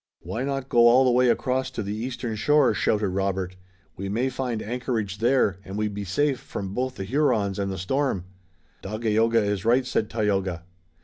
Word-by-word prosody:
"Why 95 +9 -4
not 135 -1 -2
go 120 -2 +5
all 125 +3 +6
the 125 - +4
way 125 0 +4
across 130 +1 0
to 125 -4 -4
the 100 +1 -3
eastern 120 0 -4
shore?" 140 +3 +3
shouted 105 -1 +1
Robert. 95 -1 -2 0.4
"We 95 +1 -5
may 120 +6 0
find 125 -3 -3
anchorage 110 -4 -3
there, 115 -6 +2
and 95 +1 -7
we'd 105 -1 -1
be 100 0 -5
safe 135 +7 +1
from 95 -3 -6
both 130 +3 -2
the - - -5
Hurons 105 -6 +1
and 100 -1 -1
the 95 - -4
storm!" 100 0 -1 0.6
"Dagaeoga 110 +2 +1
is 100 -1 -1
right," 125 +3 +3
said 110 -4 -1
Tayoga. 95 -6 -1
110 Hz, 185 wpm, -25 LUFS, 100-125 Hz, 0.6 s, all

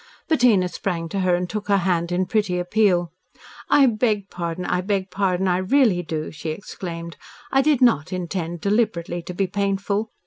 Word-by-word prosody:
Bettina 240 - +4
sprang 175 -2 -3
to 195 - -2
her 185 -1 +2
and 180 0 -2
took 210 +2 -5
her 200 -1 +4
hand 175 -2 0
in 180 +1 +1
pretty 205 -3 0
appeal. 180 -2 +2 0.6
"I 280 - +6
beg 215 -4 0
pardon! 170 +1 -4
I 180 - 0
beg 190 -1 -2
pardon, 190 -1 0
I 180 -1 +2
really 195 -1 +3
do," 160 -2 -4
she 155 0 -6
exclaimed. 170 -1 -6 0.3
"I 270 - +4
did 285 -2 +3
not 180 - +3
intend 175 -2 -4
deliberately 200 -5 0
to 180 - -7
be 195 - +1
painful. 200 +2 -1
185 Hz, 175 wpm, -22 LUFS, 175-205 Hz, 0.6 s, I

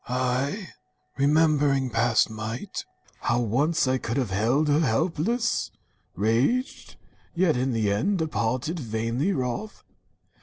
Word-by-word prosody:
I, 130 - -1 0.5
remembering 145 -2 +3
past 115 0 +3
might 110 +2 -5 0.2
— - - -32
How 120 0 +3
once 135 +7 +1
I 130 0 +1
could 115 +2 -3
have 125 -8 -1
held 120 +10 +2
her 145 +1 +3
helpless 165 - 0 0.2
— - - -43
raged, 120 - 0 0.4
Yet 170 -2 +3
in 130 +2 0
the 110 -4 +1
end 155 - +1
departed, 155 0 -1
vainly 115 - -1
wroth. 135 - -3
130 Hz, 125 wpm, -26 LUFS, 115-160 Hz, 0.5 s, remembering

